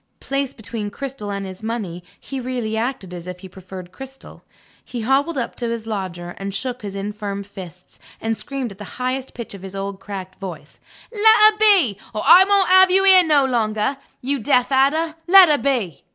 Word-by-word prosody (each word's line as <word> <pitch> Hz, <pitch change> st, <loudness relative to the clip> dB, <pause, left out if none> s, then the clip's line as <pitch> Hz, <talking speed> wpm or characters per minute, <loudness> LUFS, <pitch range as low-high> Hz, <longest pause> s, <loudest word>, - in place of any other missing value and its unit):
Placed 275 Hz, -1 st, -3 dB
between 210 Hz, 0 st, -5 dB
Cristel 255 Hz, -2 st, -6 dB
and 200 Hz, 0 st, -4 dB
his 190 Hz, +1 st, -9 dB
money, 210 Hz, -6 st, -4 dB, 0.2 s
he 270 Hz, -, -6 dB
really 245 Hz, -3 st, -3 dB
acted 225 Hz, -5 st, -3 dB
as 175 Hz, 0 st, -8 dB
if 180 Hz, 0 st, -8 dB
he 190 Hz, -, -9 dB
preferred 185 Hz, -1 st, -11 dB
Cristel. 270 Hz, +3 st, -12 dB, 0.4 s
He 240 Hz, -, -6 dB
hobbled 275 Hz, +7 st, +1 dB
up 245 Hz, -, -3 dB
to 240 Hz, -2 st, -3 dB
his 230 Hz, -1 st, -4 dB
lodger, 185 Hz, -5 st, -5 dB
and 195 Hz, 0 st, -5 dB
shook 250 Hz, -1 st, -4 dB
his 200 Hz, -2 st, -7 dB
infirm 200 Hz, 0 st, -5 dB
fists, 185 Hz, -3 st, -12 dB, 0.2 s
and 225 Hz, 0 st, -1 dB
screamed 265 Hz, -1 st, -5 dB
at 195 Hz, -, -13 dB
the 205 Hz, -, -10 dB
highest 255 Hz, +1 st, -3 dB
pitch 235 Hz, -3 st, -7 dB
of 195 Hz, -, -10 dB
his 195 Hz, 0 st, -9 dB
old 195 Hz, 0 st, -5 dB
cracked 190 Hz, -2 st, -8 dB
voice: 170 Hz, -7 st, -9 dB, 0.3 s
"Let 440 Hz, 0 st, +5 dB, 0.2 s
her 425 Hz, -, -15 dB
be, 375 Hz, -, +4 dB, 0.2 s
or 215 Hz, -, -2 dB
I 345 Hz, +6 st, +9 dB
won't 395 Hz, -2 st, +3 dB
have 375 Hz, 0 st, +7 dB
you 385 Hz, +1 st, +3 dB
here 380 Hz, -2 st, +7 dB
no 295 Hz, -4 st, +3 dB
longer! 230 Hz, +1 st, 0 dB, 0.2 s
You 275 Hz, +2 st, -1 dB
deaf 250 Hz, +2 st, +2 dB
adder, 300 Hz, +5 st, +2 dB
let 375 Hz, -1 st, +8 dB
her 295 Hz, -1 st, +3 dB
be!" 235 Hz, -, -2 dB
230 Hz, 195 wpm, -21 LUFS, 195-275 Hz, 0.4 s, I